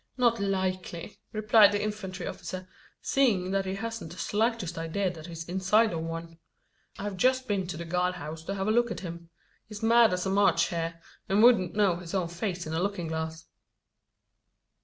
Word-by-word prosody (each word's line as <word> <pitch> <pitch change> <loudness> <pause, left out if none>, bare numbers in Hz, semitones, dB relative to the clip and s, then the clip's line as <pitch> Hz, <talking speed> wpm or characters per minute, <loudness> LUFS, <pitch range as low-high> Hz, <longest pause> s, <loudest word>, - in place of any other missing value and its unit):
"Not 240 -2 +3
likely," 185 -2 -2
replied 215 -1 +6
the 205 0 0
infantry 210 -3 -4
officer, 185 0 -6 0.4
"seeing 205 -10 +2
that 195 0 0
he 190 - -2
hasn't 225 -5 -5
the 175 - -10
slightest 215 -5 0
idea 165 +4 -1
that 160 -1 -10
he's 165 -1 -7
inside 190 +4 +3
of 165 - -2
one. 165 0 -6 0.6
I've 200 -1 -4
just 255 +5 +2
been 195 -3 0
to 175 - -5
the 170 - -5
guard 180 +2 0
house 155 +2 -7
to 195 - -3
have 195 0 -2
a - - +3
look 240 +1 +3
at - - -5
him. 170 -2 -8 0.4
He's 210 0 -9
mad 230 -1 +6
as 180 0 -1
a 190 - 0
March 200 +1 +3
hare; 165 -2 -3 0.3
and 200 +3 +4
wouldn't 210 -8 +5
know 200 -5 +3
his 175 +1 -6
own 180 -3 0
face 175 0 -3
in 155 - -5
a 160 - 0
looking 185 -4 -2
glass." 160 0 -4
190 Hz, 190 wpm, -28 LUFS, 170-210 Hz, 0.6 s, replied